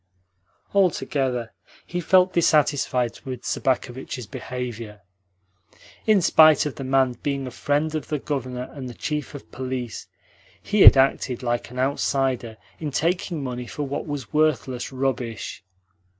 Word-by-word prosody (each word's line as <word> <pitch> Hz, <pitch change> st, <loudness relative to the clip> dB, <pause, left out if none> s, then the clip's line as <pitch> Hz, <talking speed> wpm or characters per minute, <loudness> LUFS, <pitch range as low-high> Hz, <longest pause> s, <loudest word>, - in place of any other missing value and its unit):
Altogether 135 Hz, -, +1 dB, 0.3 s
he 175 Hz, 0 st, -3 dB
felt 185 Hz, +2 st, +4 dB
dissatisfied 145 Hz, -7 st, +2 dB
with 130 Hz, -3 st, -6 dB
Sobakevitch's 130 Hz, -2 st, -2 dB
behaviour. 120 Hz, -4 st, -6 dB, 1.1 s
In 210 Hz, -4 st, +5 dB
spite 155 Hz, -3 st, +6 dB
of 150 Hz, -, -2 dB
the 135 Hz, -, -7 dB
man 130 Hz, -1 st, +2 dB
being 140 Hz, -2 st, -2 dB
a 130 Hz, -, -6 dB
friend 145 Hz, +5 st, 0 dB
of 155 Hz, -, -3 dB
the 150 Hz, -, -1 dB
Governor 130 Hz, -3 st, -4 dB
and 130 Hz, -3 st, -7 dB
the 120 Hz, -, -9 dB
Chief 150 Hz, -1 st, -4 dB
of 140 Hz, -, -11 dB
Police, 130 Hz, -3 st, -5 dB, 0.5 s
he 210 Hz, -1 st, 0 dB
had -, -, +10 dB
acted 130 Hz, -2 st, +2 dB
like 120 Hz, -1 st, -1 dB
an 125 Hz, -, -10 dB
outsider 130 Hz, -3 st, 0 dB, 0.2 s
in 155 Hz, -, -3 dB
taking 170 Hz, +2 st, -1 dB
money 125 Hz, -2 st, -5 dB
for 150 Hz, -, -4 dB
what 140 Hz, +2 st, -4 dB
was 145 Hz, -6 st, -5 dB
worthless 145 Hz, -5 st, +1 dB
rubbish. 130 Hz, -7 st, -3 dB
135 Hz, 135 wpm, -24 LUFS, 125-150 Hz, 1.1 s, had